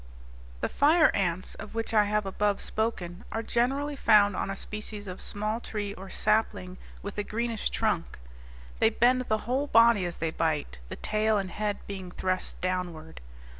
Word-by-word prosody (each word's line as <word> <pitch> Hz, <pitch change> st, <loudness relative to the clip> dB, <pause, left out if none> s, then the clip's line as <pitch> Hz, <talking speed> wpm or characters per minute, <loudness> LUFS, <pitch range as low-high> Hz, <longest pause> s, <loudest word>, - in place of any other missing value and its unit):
The -, -, +1 dB
fire 310 Hz, +3 st, +5 dB
ants, 180 Hz, -2 st, -1 dB
of -, -, -9 dB
which 225 Hz, 0 st, -2 dB
I 210 Hz, -1 st, +5 dB
have 210 Hz, 0 st, 0 dB
above 205 Hz, +1 st, 0 dB
spoken, 195 Hz, -5 st, -2 dB
are 225 Hz, -, -2 dB
generally 270 Hz, +6 st, 0 dB
found 205 Hz, -6 st, +5 dB
on -, -, -2 dB
a 195 Hz, -, -2 dB
species 210 Hz, +1 st, -5 dB
of 185 Hz, -1 st, -7 dB
small 215 Hz, +2 st, -2 dB
tree 205 Hz, -4 st, -4 dB
or 190 Hz, 0 st, -10 dB
sapling, 210 Hz, -4 st, 0 dB, 0.2 s
with 205 Hz, +1 st, -5 dB
a -, -, 0 dB
greenish 230 Hz, +1 st, -2 dB
trunk. -, -, -1 dB, 0.6 s
They 220 Hz, -, +5 dB
bend 245 Hz, +3 st, +3 dB
the 220 Hz, -3 st, 0 dB
whole 265 Hz, +5 st, 0 dB
body 230 Hz, -7 st, +5 dB
as 175 Hz, -, -6 dB
they 165 Hz, 0 st, -1 dB
bite, 155 Hz, -, -1 dB
the -, -, -5 dB
tail 215 Hz, 0 st, +1 dB
and 190 Hz, -2 st, -2 dB
head 210 Hz, -1 st, -2 dB
being 190 Hz, -2 st, -6 dB
thrust 185 Hz, +1 st, -2 dB
downward. 175 Hz, -, -3 dB
210 Hz, 170 wpm, -28 LUFS, 185-225 Hz, 0.6 s, fire